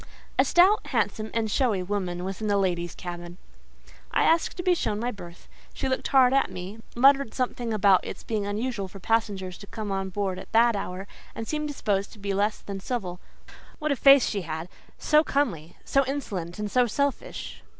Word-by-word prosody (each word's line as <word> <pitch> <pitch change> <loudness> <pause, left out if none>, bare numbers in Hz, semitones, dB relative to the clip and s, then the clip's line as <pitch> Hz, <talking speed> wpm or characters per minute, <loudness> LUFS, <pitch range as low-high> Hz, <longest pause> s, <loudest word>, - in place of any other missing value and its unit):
A - - +6
stout, 380 +5 +4
handsome, 215 0 -1
and 225 -2 -1
showy 220 -9 +1
woman 180 -2 -3
was 190 +3 -5
in 215 - -1
the 205 -1 +2
ladies' 175 -3 -1
cabin. 175 -1 -7 0.7
I - - +2
asked 330 +3 +2
to 360 - -3
be 365 0 +4
shown 210 -11 -1
my 240 +2 -1
berth; 175 -5 -12 0.3
she - - -2
looked 260 0 -1
hard 260 -2 +5
at 275 -6 +3
me, 185 +4 -7 0.2
muttered 270 -1 +4
something 245 -2 -2
about 200 -3 +4
its - - -7
being 215 -2 -2
unusual 210 -1 -2
for 195 +1 -11
passengers 195 -3 -1
to 200 - -11
come 215 -2 -5
on 195 0 -2
board 190 -1 -2
at - - -11
that 230 0 +5
hour, 190 -1 -4 0.3
and 225 - -5
seemed 300 -1 -2
disposed 205 -8 -1
to - - -14
be 200 -1 -3
less 205 +2 0
than 200 -1 -6
civil. 185 -5 -4 0.6
What 300 0 -1
a - - +2
face 275 0 +7
she 200 - -2
had—so 170 - -1
comely—so 275 - 0
insolent 195 -11 -4
and 210 -1 -4
so 250 -1 +4
selfish! 280 +5 -3
210 Hz, 190 wpm, -26 LUFS, 190-255 Hz, 0.7 s, face